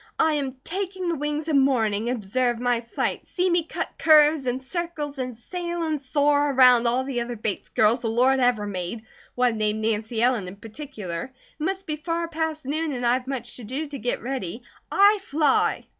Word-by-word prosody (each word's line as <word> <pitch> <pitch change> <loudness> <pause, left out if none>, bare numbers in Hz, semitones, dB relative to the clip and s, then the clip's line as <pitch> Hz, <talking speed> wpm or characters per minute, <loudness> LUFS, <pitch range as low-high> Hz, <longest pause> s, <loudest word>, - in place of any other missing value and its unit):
"I 315 -1 +3
am 275 -3 -2
'taking 375 0 -3
the 335 - 0
wings 295 +1 -3
of 310 - +1
morning,' 230 -5 +2
observe 240 +1 0
my 245 -1 +1
flight! 235 - -2
See 365 0 -1
me 345 -1 +3
cut 325 - -4
curves 300 -3 +5
and 250 +1 0
circles 295 -1 -5
and 250 -2 -3
sail 345 +6 -4
and 310 -3 -1
soar 290 +1 +2
around 250 -3 +6
all 250 +2 +1
the 260 -3 -2
other 240 0 -4
Bates 215 -2 -3
girls 220 +3 +3
the 235 - -2
Lord 255 +4 +3
ever 245 -4 +2
made, 195 +2 -4 0.3
one 245 -3 +1
named 215 0 0
Nancy 220 +1 -1
Ellen 240 -6 +2
in 180 - -8
particular. 215 - -6 0.3
It - - -4
must 385 +3 -2
be 305 -1 -3
far 335 +2 -2
past 320 -2 -3
noon, 310 +2 -1
and 245 -1 -3
I've 250 +2 +1
much 255 -3 -4
to 245 - -10
do 265 +8 -3
to 280 -2 -6
get 245 - -2
ready. 240 -4 -4 0.3
I 405 +1 +5
fly!" 300 -5 +1
260 Hz, 195 wpm, -24 LUFS, 235-310 Hz, 0.3 s, around